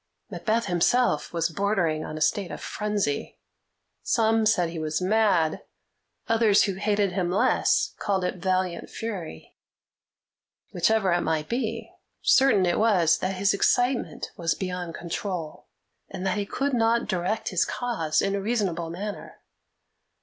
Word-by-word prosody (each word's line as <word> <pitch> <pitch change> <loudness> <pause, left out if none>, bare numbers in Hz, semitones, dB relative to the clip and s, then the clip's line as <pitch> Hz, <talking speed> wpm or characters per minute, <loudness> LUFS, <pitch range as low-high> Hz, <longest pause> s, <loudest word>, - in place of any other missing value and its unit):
Macbeth 230 +1 -1
himself 180 0 +1
was 165 -1 0
bordering 170 -4 0
on 155 - -6
a - - -7
state 190 +4 +1
of - - -7
frenzy. 210 -9 -2 0.6
Some 225 -1 +2
said 180 -6 +2
he 165 - -5
was 155 0 -2
mad; 185 -5 +2 0.7
others, 225 -3 +4
who 200 - 0
hated 205 0 0
him 180 -1 -1
less, 185 - +2
called 195 -3 0
it 180 - -2
valiant 185 -1 -1
fury. 190 - -7 1.1
Whichever 195 +2 +2
it 175 - +1
might 155 -2 -1
be, 240 +3 -3 0.3
certain 265 -9 +4
it 175 - +1
was 190 -8 +3
that 190 +1 -2
his 195 +2 +2
excitement 245 +5 0
was 165 -3 -1
beyond 180 -3 -4
control, 170 -2 -5 0.4
and 190 -1 -6
that 190 +2 0
he 200 - -3
could 275 +5 -2
not 230 0 +2
direct 185 +4 -1
his 185 - +2
cause 195 -11 -1
in 195 - 0
a 200 - -1
reasonable 195 -7 -1
manner. 200 +5 -7
190 Hz, 140 wpm, -26 LUFS, 170-215 Hz, 1.1 s, others